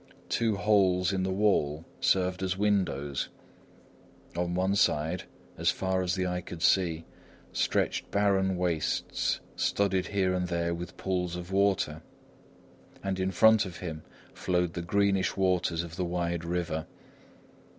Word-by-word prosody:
Two 115 -3 +1
holes 95 -3 +3
in 95 - 0
the 95 - 0
wall 85 -6 +1
served 90 -1 +1
as 95 0 -1
windows. 90 -9 0 1.1
On 90 0 -1
one 95 +2 +1
side, 80 -2 +1 0.3
as - - +3
far 95 0 0
as 90 0 0
the 95 -1 0
eye 90 0 -1
could 85 -1 -7
see, 85 -4 +2 0.5
stretched - - 0
barren 95 -2 +2
wastes 85 -4 -1
studded 95 -2 +1
here 95 -2 +1
and 90 -1 -1
there 85 -1 -1
with 85 0 -7
pools 90 -2 -1
of 90 +1 -7
water; 95 -6 +1 1.0
and 95 -1 -2
in 95 0 +1
front 110 +3 +5
of 90 -3 -7
him 80 -4 -6 0.3
flowed 90 -2 0
the 85 - -3
greenish 95 +2 +1
waters 90 -3 +1
of 85 0 -9
the 90 - 0
wide 85 -1 -2
river. 85 -2 -2
90 Hz, 140 wpm, -29 LUFS, 85-95 Hz, 1.1 s, front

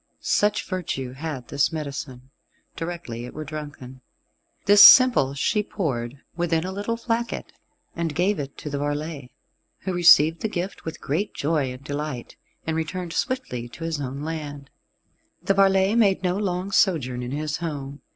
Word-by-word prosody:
Such 210 0 +1
virtue 155 -9 -3
had 135 -2 -6
this 140 0 +1
medicine, 140 -4 -6 0.4
directly 165 -9 -5
it 125 - -10
were 155 - -4
drunken. 145 -4 -8 0.6
This 205 0 +8
simple 240 - +8
she 210 +9 +1
poured 140 - -3 0.2
within 165 -2 0
a 185 - -3
little 205 +4 -3
flacket, 230 0 -3 0.4
and 165 -3 -2
gave 185 +4 +1
it 140 -1 -6
to 150 - -6
the 140 - -2
varlet, 145 -1 -3 0.5
who 190 - -3
received 165 -2 +6
the 220 - -1
gift 180 0 -4
with 160 - -6
great 165 +10 -2
joy 150 -4 0
and 125 +1 -10
delight, 145 -3 -5 0.3
and 160 - -1
returned 165 +2 -3
swiftly 255 - -2
to 165 - -10
his 165 -3 -2
own 135 +2 -5
land. 145 -3 -6 0.7
The 195 - +2
varlet 195 +1 +4
made 195 -4 +3
no 180 0 +1
long 190 -1 -2
sojourn 140 - +2
in 125 - -5
his 150 +2 -2
home. 145 -4 -5
160 Hz, 160 wpm, -24 LUFS, 140-185 Hz, 0.7 s, This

